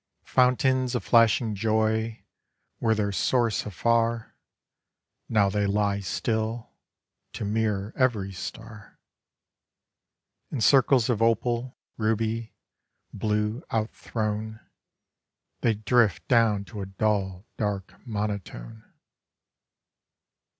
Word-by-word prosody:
Fountains 130 0 +2
of 125 - -1
flashing 115 -1 +4
joy 110 +1 0 0.6
were 110 -1 +2
their 105 -1 0
source 115 +3 +1
afar; 115 +2 0 0.9
Now 105 -3 +3
they 100 +1 0
lie 100 0 +1
still, 110 +3 -2 0.6
to - - -4
mirror 105 -1 -1
every 110 -7 +1
star. 105 +3 -9 1.5
In 140 - -4
circles 130 0 +4
of 115 -3 0
opal, 120 +2 +1 0.2
ruby, 110 +1 -1 0.6
blue, 105 - -1
out 110 0 -1
thrown, 110 0 -4 1.0
They 115 -2 +2
drift 110 -2 +2
down 115 -5 +3
to 105 -1 -7
a 95 - -5
dull, 95 -1 -1
dark 100 -3 -2
monotone. 105 - -5
110 Hz, 95 wpm, -26 LUFS, 105-115 Hz, 1.5 s, flashing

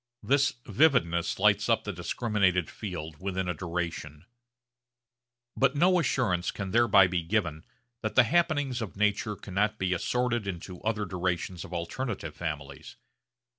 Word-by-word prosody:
This 140 +5 +2
vividness 85 - +2
lights - - +3
up - - +3
the - - -4
discriminated 95 -1 0
field 80 -7 -6
within 95 -1 -2
a 90 - 0
duration. 85 -2 -5 1.3
But 135 +2 +2
no 180 +4 +4
assurance 115 - 0
can 100 -2 -5
thereby 110 -4 +6
be 90 -1 -1
given 85 -3 -1 0.4
that 110 - -3
the 130 - +8
happenings 145 -3 +1
of 105 -4 -6
nature 105 +1 +1
cannot 105 +2 -1
be 95 -2 0
assorted 120 +3 -1
into 90 -1 -6
other 105 -1 -1
durations 90 -1 -2
of - - -11
alternative 85 - -4
families. 75 -5 -6
95 Hz, 135 wpm, -28 LUFS, 85-120 Hz, 1.3 s, the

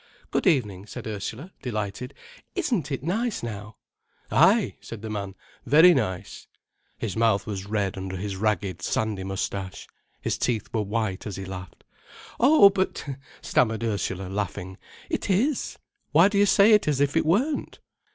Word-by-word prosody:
"Good - - +1
evening," 105 - +1
said - - -8
Ursula, 110 - -5
delighted. 115 +2 -4 0.4
"Isn't 240 - -1
it 135 -1 -3
nice 215 - -1
now?" 105 -2 -6 0.6
"Ay," - - +4
said 115 -2 -9
the 110 - -4
man, 100 -2 -4 0.3
"very 165 +5 +7
nice." 100 - -3 0.5
His 105 -5 -4
mouth 110 -4 +2
was 100 -2 -5
red 100 -2 -1
under 95 0 -5
his 100 +1 -4
ragged, 95 -3 -1
sandy 105 0 -1
moustache. 95 0 -4 0.3
His - - -2
teeth 115 -4 -1
were 110 - +1
white 105 -1 -2
as 100 - -5
he 95 - -6
laughed. 90 -3 -9 0.6
"Oh, 255 -5 +7
but—" 190 -1 -1 0.4
stammered 115 -1 +1
Ursula, 100 -4 -2
laughing, 95 -1 -4 0.3
"it - - -3
is. 240 +9 +1 0.4
Why 170 +6 +7
do 200 -1 +1
you 205 - +5
say 200 +3 +6
it 210 -5 +5
as 145 -3 +1
if 145 +1 +1
it 165 - +3
weren't?" 235 - 0
110 Hz, 155 wpm, -26 LUFS, 100-165 Hz, 0.6 s, very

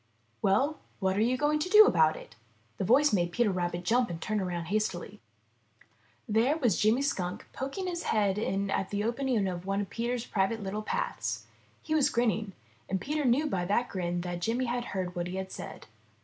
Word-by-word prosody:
''Well, 270 +11 +2 0.2
what 190 -1 +1
are 205 - +1
you 245 +3 +2
going 295 +2 +2
to 355 - -2
do 425 +2 +9
about 160 - +4
it?" - - -12 0.4
The - - 0
voice 265 +7 +4
made 175 -3 +1
Peter 210 +1 +2 0.3
jump 240 +6 +2
and 170 -1 -5
turn 215 +5 -1
around 175 -3 -3
hastily. 210 -5 -2 1.1
There 235 +8 +2
was 240 - +1
Jimmy 225 +6 +3
Skunk 180 -10 -2
poking 275 +8 -4
his 350 -1 -3
head 205 -2 +1
in 200 -2 -1
at 190 - -1
the 205 0 -1
opening 235 -3 0
of 180 0 -5
one 195 +1 0
of 200 - -6
Peter's 240 0 -2
private 205 +2 0
little 200 +2 -3
paths. 480 - -3 0.4
He 310 - -2
was 305 -3 +4
grinning, 220 -4 0 0.4
and 190 - 0
Peter 295 +8 -2
knew 255 +5 +3
by 190 -12 -1
that 210 +6 +1
grin 175 -2 -2
that 175 0 -4
Jimmy 235 +6 0
had 240 0 -2
heard 185 -4 -3
what 175 -1 -3
he 180 - -5
had 190 0 -4
said. - - -8
215 Hz, 195 wpm, -29 LUFS, 190-255 Hz, 1.1 s, do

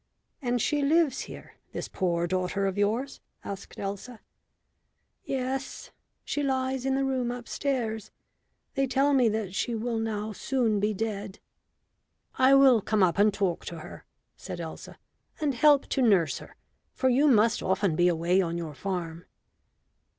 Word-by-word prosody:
"And 245 -2 0
she 290 +5 +1
lives 295 -2 +2
here, - - -11 0.2
this - - -4
poor 175 -3 0
daughter 185 +2 -1
of 195 -1 -1
yours?" 220 +7 -1 0.2
asked 200 0 -8
Elsa. 205 +4 -5 1.1
"Yes; 265 0 -3 0.3
she 290 - -2
lies 265 -1 -1
in 265 - +2
the 270 - +1
room 260 -2 0
upstairs. 240 -3 -3 0.6
They 275 -2 +1
tell 275 +2 +2
me 250 -4 +4
that 210 -3 -3
she 235 +4 -1
will 225 +1 -2
now 220 -1 -2
soon 230 -2 0
be 210 +2 +1
dead." 205 -1 -4 1.0
"I 260 +1 +6
will 265 -5 +6
come 210 0 +1
up 180 +1 +2
and 210 +1 +5
talk 195 -4 -1
to 170 - -6
her," - - -10 0.3
said - - -7
Elsa, - - -8 0.4
"and 295 -3 0
help 285 +3 +5
to 270 - 0
nurse 195 - +3
her, - - -13 0.4
for 260 - +1
you 265 +4 +4
must 230 -3 +4
often 190 -2 +1
be 175 +2 +4
away 175 +2 +2
on 170 -2 -2
your 165 -3 -5
farm." 175 0 -4
220 Hz, 155 wpm, -28 LUFS, 195-265 Hz, 1.1 s, I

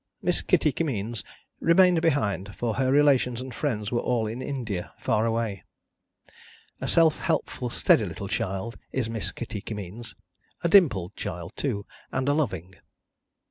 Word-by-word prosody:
Miss - - +1
Kitty 150 - +3
Kimmeens 120 -7 -2 0.4
remained 175 0 +5
behind, 105 - 0
for 120 -2 -1
her 130 +1 +1
relations 135 -4 +4
and 130 0 -6
friends 110 -7 -2
were 120 - +1
all 120 -2 0
in 115 +4 -4
India, 115 -10 -4
far 110 +2 +1
away. 115 -4 -1 1.2
A - - -3
self 165 -2 +4
helpful 160 -7 -1
steady 110 - +3
little 90 +2 -6
child 95 +4 -3
is 120 -4 -1
Miss 115 -2 -3
Kitty 110 -3 -6
Kimmeens: 105 +2 -7 0.5
a 170 - +2
dimpled 120 - +4
child 85 0 -5
too, 105 -8 -2 0.3
and 130 0 -1
a 145 - +4
loving. 95 - -1
115 Hz, 145 wpm, -26 LUFS, 100-140 Hz, 1.2 s, remained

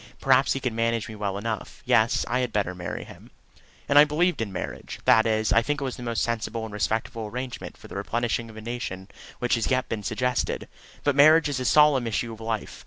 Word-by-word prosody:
Perhaps 135 0 +4
he 135 - -2
could 125 -3 -2
manage 115 0 0
me 110 - -8
well 100 -2 -3
enough. 110 0 -5
Yes; 110 +2 +3
I 125 +2 0
had 125 -2 -1
better 100 -4 -1
marry 90 -1 -5
him. - - -14 0.6
And 145 +1 +6
I - - +10
believe 160 +1 +1
in 105 -3 -3
marriage 95 - -6
that 110 0 +5
is, 110 0 +1
I 115 - +5
think 145 +5 -2
it 135 -3 -3
the - - -9
most 120 -1 -1
sensible 115 -1 -2
and 110 - -9
respectable 110 +2 -2
arrangement 125 +3 -6
for - - -13
the - - -10
replenishing 115 +3 -2
of 110 - -12
a - - -7
nation 110 -5 -5 0.3
which 120 - -1
has 115 - +1
yet 130 -1 0
been 110 -2 -3
suggested. 125 +5 -1 0.4
But 145 -2 +2
marriage 155 +2 +6
is 140 -3 -2
a 130 - -3
solemn 145 -4 +5
issue 115 +1 -2
of 110 - -12
life. 110 -1 -4
115 Hz, 225 wpm, -25 LUFS, 110-130 Hz, 0.6 s, I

